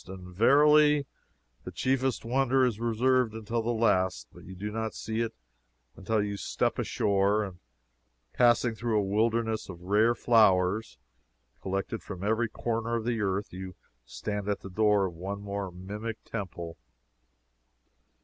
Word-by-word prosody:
And, 90 -1 -10
verily, 150 +5 +5 0.6
the - - -7
chiefest 130 -2 0
wonder 130 +1 +2
is 115 -4 -1
reserved 120 0 +1
until 110 +1 -2
the 115 - -3
last, 110 -6 +1
but - - -14
you 95 - -9
do 105 +3 -5
not 110 0 -3
see 110 +1 -4
it 115 -1 -2 0.6
until 105 +2 0
you 100 -1 -3
step - - -1
ashore, 100 +1 +1
and 95 -3 -8 0.7
passing 120 -1 +3
through 110 0 -1
a 105 - +2
wilderness 110 +2 0
of 90 -2 -9
rare 105 +5 +3
flowers, 105 -3 +3 0.6
collected 95 +3 -3
from 95 -2 -8
every 110 +2 +1
corner 115 +1 -2
of 115 -1 -2
the 115 -2 -1
earth, 100 -1 -2
you 95 0 -7 0.3
stand 105 - -4
at 100 - -1
the 95 - -9
door 105 0 +3
of 90 - -4
one 95 +4 -5
more 100 -1 -4
mimic 105 +5 -6
temple. 85 -6 -6
110 Hz, 150 wpm, -28 LUFS, 95-115 Hz, 0.7 s, verily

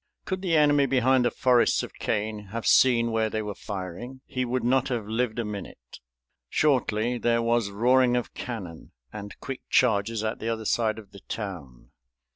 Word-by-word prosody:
Could 185 0 -3
the 175 -4 +2
enemy 145 -2 +4
behind 130 0 +3
the - - +4
forests 125 +1 +3
of - - -8
cane 105 -1 -3
have 115 +3 -5
seen 120 -3 +4
where 110 -1 +1
they 110 0 -2
were 105 -1 -4
firing 100 +7 -7
he 130 -2 -2
would 125 0 -2
not 130 +2 +2
have 120 -4 -2
lived 115 +1 -1
a 120 - -1
minute. 100 -12 -8 0.5
Shortly 125 -5 +1
there 115 +1 +1
was 115 -3 +1
roaring 125 +4 +3
of 120 - -4
cannon 95 -10 -7 0.2
and 105 -1 -8
quick 135 -2 -6
charges 110 -2 +2
at 110 0 -2
the 115 - -3
other 110 -1 -3
side 110 0 +1
of 105 -3 -12
the 100 - -12
town. 90 - -7
115 Hz, 180 wpm, -26 LUFS, 105-125 Hz, 0.5 s, enemy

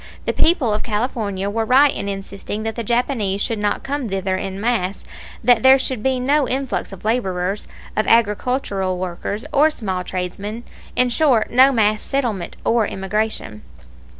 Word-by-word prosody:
The - - 0
people 285 -10 +3
of 210 - -1
California 210 -3 -2
were 225 +2 -1
right 265 +5 +5
in 200 - -4
insisting 200 +2 -5
that 225 0 -2
the 235 - -3
Japanese 230 -4 0
should 225 +1 -1
not 205 0 -1
come 275 -4 -3
thither 190 -1 -1
in 190 +1 -4
mass, 205 -4 -1 0.4
that 240 -1 +5
there 265 +2 +7
should 260 -3 -3
be 260 +1 +1
no 280 +2 +2
influx 260 -6 -2
of 195 +1 -11
laborers, 195 -4 -1 0.3
of 215 - 0
agricultural 210 -4 +1
workers, 185 +4 -4
or 295 +2 +5
small 190 -11 -3
tradesmen 195 +6 -5 0.3
in 250 0 +3
short, 245 -3 +2
no 260 +3 +6
mass 215 -3 +2
settlement 240 -10 -2
or 230 -2 +2
immigration. 195 - -3
220 Hz, 160 wpm, -20 LUFS, 195-250 Hz, 0.4 s, there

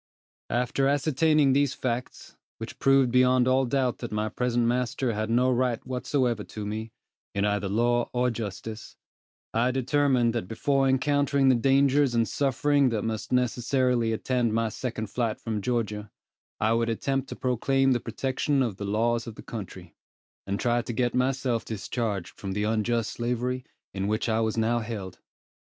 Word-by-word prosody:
After 125 +3 +1
ascertaining 145 0 +3
these 140 -1 +2
facts, 125 0 -4 0.2
which 110 - -8
proved 135 -2 +4
beyond 125 0 +4
all 130 +1 +3
doubt 130 -1 0
that 120 - -6
my 105 0 -1
present 120 +1 0
master 125 +1 0
had 110 +1 -2
no 125 +3 +3
right 125 -2 0
whatsoever 125 -3 -1
to 105 0 -7
me, 110 +2 -4 0.4
in 100 0 +1
either 105 -1 0
law 120 +3 +1
or 125 0 +1
justice, 110 0 -6 0.6
I 115 +3 +2
determined 130 -2 +2
that 115 -6 -3
before 135 +5 +1
encountering 140 +1 +2
the 130 - +5
dangers 135 +1 +3
and 115 -1 +2
sufferings 140 0 +2
that 110 -3 -2
must 110 -1 -4
necessarily 125 -1 +1
attend 120 0 0
my 115 0 +1
second 110 -3 -5
flight 115 -3 -1
from 110 -2 -3
Georgia, 105 -3 -2 0.5
I 110 +1 +2
would 115 0 +1
attempt 135 +4 -1
to - - -5
proclaim 135 +2 +1
the 125 - +2
protection 130 +4 -1
of 110 -7 -3
the 100 - -5
laws 115 +3 0
of 115 - -7
the - - -11
country, 95 -6 -8 0.5
and 100 +1 -2
try 120 0 +1
to 120 - -5
get 120 +1 0
myself 125 -2 0
discharged 105 -2 -4
from 95 -1 -4
the 105 +1 -1
unjust 110 +1 0
slavery 125 +2 -2 0.3
in 95 0 -2
which 110 +3 -1
I 110 -1 +1
was 110 0 0
now 115 +1 +2
held. 110 -5 -6
120 Hz, 165 wpm, -27 LUFS, 110-130 Hz, 0.6 s, the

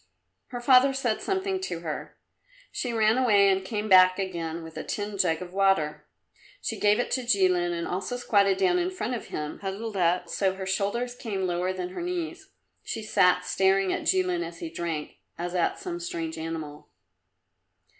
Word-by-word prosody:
Her 245 - -6
father 260 +2 +5
said 240 -5 -1
something 385 -1 -1
to 370 - -4
her. - - -6 0.5
She 245 - -3
ran 225 +1 +3
away 205 -6 +5
and 190 0 +1
came 210 +2 -3
back 185 -2 +7
again 170 -4 -4
with 160 0 -10
a - - -5
tin 205 0 -4
jug 165 -1 +2
of 180 0 -11
water. 155 -7 +1 0.5
She - - -4
gave 205 0 +4
it 245 - -1
to 260 - +1
Jilin 185 -7 +2
and 170 -1 -3
also 195 +7 -3
squatted 200 -5 +3
down 360 - +3
in 355 +1 0
front 370 -9 -3
of 240 - -5
him, 150 0 -5
huddled 205 +3 -5
up, 175 0 +2
so 190 +3 +1
that 190 - -6
her 190 - -5
shoulders 205 +6 -1
came 210 -6 -3
lower 180 +1 0
than 185 -1 -4
her 185 - -6
knees. 355 +2 -4 0.3
She 225 - -5
sat 180 -3 +3
staring 190 0 +2
at - - -3
Jilin 180 -2 +2
as 170 0 -8
he 165 -1 -6
drank, 165 -3 -4 0.2
as 175 +1 -4
at 175 -2 +1
some 360 -3 -5
strange 345 -2 -4
animal. 160 -2 -6
195 Hz, 185 wpm, -27 LUFS, 180-245 Hz, 0.5 s, back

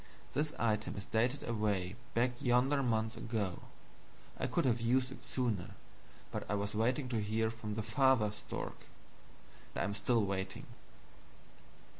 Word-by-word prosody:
This 150 +1 +1
item 110 -2 +1
is 100 - -5
dated 120 +5 +1
away 105 -5 0 0.2
back 120 +2 +4
yonder 130 +2 +4
months 110 -2 +1
ago. 105 -6 -2 0.8
I - - +1
could - - +1
have 120 -2 +2
used 125 +2 +2
it - - -10
sooner, 115 -8 -1 0.6
but - - -2
I 105 - +2
was 100 0 -2
waiting 125 +6 +1
to 115 -3 0
hear 110 +2 +1
from 110 -2 -5
the 110 - -1
Father 115 -1 +4
stork. 105 - -6 0.9
I - - +1
am 100 - -1
still 110 +1 +2
waiting. 95 0 -3
110 Hz, 145 wpm, -35 LUFS, 105-125 Hz, 0.9 s, back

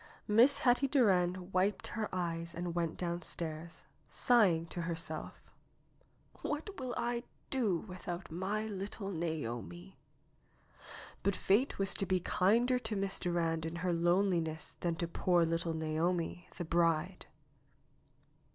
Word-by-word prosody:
Miss 240 +7 +6
Hetty 275 -1 +3
Durand 185 -8 +2
wiped 190 +3 +1
her 220 -2 -2
eyes 170 -2 -3
and 175 0 -3
went 170 -2 -1
downstairs, 170 -2 -4 0.3
sighing 195 -10 +4
to 175 - -3
herself: 165 -2 -4 1.0
^'What 315 +6 -4
will 255 -2 -3
I 240 0 0 0.3
do 225 -10 +2
without 180 -3 -6
my 195 +6 -1
little 200 -1 -4
Naomi?" 165 - -4 1.2
But 200 -1 +1
fate 220 +8 +2
was 195 -1 +1
to 195 - -1
be 185 -1 +2
kinder 235 +9 +3
to 225 - -3
Miss 195 -1 -1
Durand 165 -2 0
in 160 +1 -3
her 175 +1 0
lone 175 +4 +3
liness 160 -3 -2
than 170 -1 0
to 170 +1 -2
poor 175 0 +2
little 165 0 -1
Naomi, 165 +2 -1
the 175 - -3
bride. 170 +2 +1
180 Hz, 130 wpm, -34 LUFS, 165-200 Hz, 1.2 s, Miss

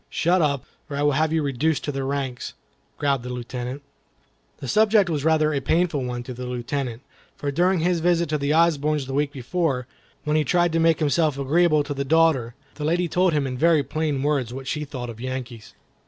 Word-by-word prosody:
"Shut 175 +2 +2
up, 140 -4 0 0.2
or 140 - -4
I 145 - 0
will 145 - +4
have 155 +3 +1
you 160 -1 +1
reduced 145 +3 0
to 145 - -2
the 135 -1 -3
ranks," 135 -2 -3 0.4
growled 140 -3 +1
the 125 - -7
Lieutenant. 125 +2 -5 0.7
The 135 - -7
subject 210 - +4
was 145 -3 -1
rather 155 -1 +3
a 140 - +1
painful 160 0 +1
one 125 -1 -4
to 125 - -7
the 125 +1 -6
Lieutenant, 125 0 -4 0.3
for 145 - -3
during 180 +4 +2
his 175 0 +1
visit 170 0 +2
to 150 -1 0
the 140 +1 0
Osbornes 150 -3 +2
the 135 - -6
week 145 +1 0
before, 135 -1 -1 0.4
when 150 0 0
he 155 - +3
tried 175 +3 +2
to 165 - +2
make 165 0 +4
himself 150 -1 +2
agreeable 155 +2 +3
to 145 0 -4
the 140 0 -2
daughter, 145 -6 +2 0.2
the 150 - -7
lady 170 +3 +1
told 180 +1 +2
him 145 -2 +1
in 125 -1 -4
very 160 -2 +4
plain 150 -2 -2
words 140 -5 0
what 135 +1 -7
she 150 +3 -3
thought 125 -4 -6
of 115 0 -12
Yankees. 125 -3 -6
145 Hz, 215 wpm, -23 LUFS, 130-160 Hz, 0.7 s, will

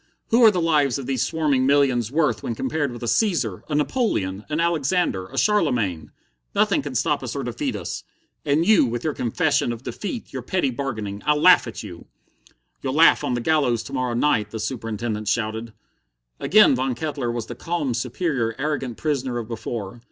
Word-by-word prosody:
what 235 +1 +4
are 225 - +9
the 185 -4 0
lives 150 -6 +2
of 135 - -6
these 130 -2 -1
swarming 150 -5 +1
millions 130 -4 +2
worth 140 - +1
when 115 - -3
compared 140 +3 -1
with 120 0 -8
a - - -3
Caesar, 145 - 0
a 150 - -1
Napoleon, 145 - 0
an 155 +1 -1
Alexander, 165 - 0
a - - -11
Charlemagne? 125 - +1 0.4
Nothing - - +3
can - - -6
stop - - +1
us - - -5
or - - -3
defeat - - -3
us. - - -5 0.4
And 150 +4 +2
you, 215 0 +6
with 120 0 -3
your 155 - -1
confession 145 +2 0
of 120 +1 -7
defeat, 215 - -6
your - - -4
petty 180 -8 0
bargaining 110 -6 -4
I 150 +1 +3
laugh 175 -1 +6
at 115 - -7
you!" 90 -5 -10 0.7
"You'll 130 0 -2
laugh 160 -1 +6
on 135 -4 0
the 120 - -2
gallows 130 -5 +1
to 140 - -10
morrow 130 -2 -1
night!" 120 -5 +1
the 110 - -6
Superintendent 110 -2 -3
shouted. 110 +1 -1 0.7
Again 215 -6 +5
Von 130 0 -1
Kettler 140 -3 -3
was 120 -2 -4
the - - -7
calm, 165 -7 -2
superior, 120 -2 -1
arrogant 135 -6 -2
prisoner 135 -5 -1
of 115 -2 -4
before. 115 -1 -5
130 Hz, 190 wpm, -23 LUFS, 115-155 Hz, 0.7 s, are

